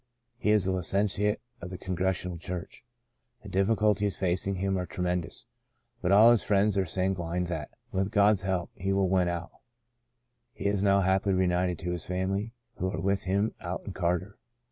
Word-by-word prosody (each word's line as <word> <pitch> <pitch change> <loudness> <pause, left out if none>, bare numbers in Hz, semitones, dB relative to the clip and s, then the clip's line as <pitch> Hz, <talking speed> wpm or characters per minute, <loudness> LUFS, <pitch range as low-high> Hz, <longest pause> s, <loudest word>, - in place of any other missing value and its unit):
He 105 - 0
is 105 -3 +4
a 95 - +1
licentiate 100 +3 +1 0.2
of 90 - -6
the 90 - -6
Congrega 95 +1 0 0.2
tional 85 - -7
Church. 90 +3 -6 0.6
The 100 - -9
difficulties 105 +1 +2
facing 95 +1 0
him 95 +1 0
are 90 -1 -2
tremendous, 90 +5 -3 0.6
but 90 - +1
all 110 +4 +8
his 120 - +4
friends 100 0 +2
are 95 -2 +1
sanguine 90 -1 -1
that, 80 -5 -4 0.2
with 95 +1 0
God's 105 -1 +4
help, 95 -2 -2
he 95 +2 -2
will 95 -1 +2
win 90 -1 +3
out. 85 0 -3 1.0
He - - -8
is 100 -1 +1
now 100 -1 +4
happily 95 +1 +2
reunited 90 -1 +1
to 90 +1 -2
his 85 -3 -4
family, 95 +4 -1 0.3
who 95 - -1
are 95 - -4
with 100 +2 0
him 100 +4 +1
out 90 +1 -4
in 100 - -6
Carter. 90 +2 -1
95 Hz, 180 wpm, -28 LUFS, 90-100 Hz, 1.0 s, all